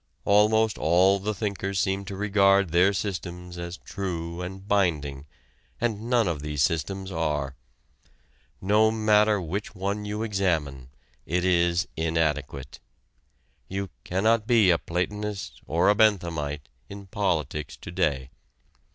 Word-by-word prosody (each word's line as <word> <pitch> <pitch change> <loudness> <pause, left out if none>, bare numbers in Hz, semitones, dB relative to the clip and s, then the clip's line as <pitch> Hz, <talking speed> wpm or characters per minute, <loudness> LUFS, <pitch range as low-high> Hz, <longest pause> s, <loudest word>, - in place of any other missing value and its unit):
Almost 110 +2 +3
all 95 +4 +4
the 105 +2 -2
thinkers 100 -1 -2
seem 100 0 0
to 95 - -6
regard 100 -2 +3
their 90 +4 +4
systems 90 -3 -5
as 85 +1 -6
true 85 -3 -5
and 95 +2 -7
binding, 75 -9 0 0.5
and 115 0 -2
none 120 -4 +3
of 80 -4 -2
these 75 -1 -1
systems 95 +4 -1
are. 75 -5 -2 1.0
No 105 +3 +3
matter 105 -1 +3
which 95 +5 -5
one 100 +2 -2
you 105 +1 -3
examine, 80 - -1 0.4
it 90 +2 0
is 85 0 +2
inadequate. 75 -4 -2 0.9
You 95 0 -4
cannot 110 +4 +1
be 110 -6 +5
a 85 - +2
Platonist 100 +3 -4
or 85 +2 +2
a 105 - +6
Benthamite 85 - +1 0.2
in 100 0 -9
politics 75 -8 -2
to - - -9
day. 70 -8 -1
95 Hz, 125 wpm, -26 LUFS, 80-105 Hz, 1.0 s, a